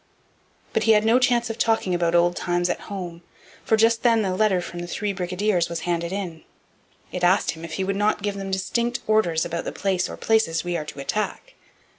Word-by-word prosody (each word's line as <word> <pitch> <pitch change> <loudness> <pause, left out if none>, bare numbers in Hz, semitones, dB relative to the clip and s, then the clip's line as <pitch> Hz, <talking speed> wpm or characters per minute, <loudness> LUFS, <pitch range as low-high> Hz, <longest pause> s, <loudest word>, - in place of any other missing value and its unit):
But - - +1
he 225 - +6
had 210 0 +3
no 230 +3 +5
chance 240 -2 +2
of 225 - -8
talking 225 -5 +1
about 170 -1 +1
old 175 +1 +3
times 175 0 0
at - - -3
home, 175 -4 -6 0.4
for 220 - +2
just 225 +1 +3
then 230 -3 +3
a 185 -1 -1
letter 195 -2 +3
from 175 0 -6
the 175 - -5
three 205 +3 -2
brigadiers 180 -1 0
was 170 -1 -4
handed 170 0 -2
in. 185 -5 -5 0.7
It 180 - -4
asked 185 +3 +3
him 160 0 -10
if 165 -1 -7
he 190 - -1
would 195 +1 -1
not 205 0 +1
give 205 -1 0
them 195 -1 -5
'distinct 235 +6 -1
orders' 195 -7 +2
about 170 0 -3
'the - - -5
place 190 -2 0
or - - -7
places 220 -8 +1
we 175 0 -2
are 155 - -3
to 145 - -9
attack.' 215 - -3
190 Hz, 220 wpm, -24 LUFS, 175-215 Hz, 0.7 s, he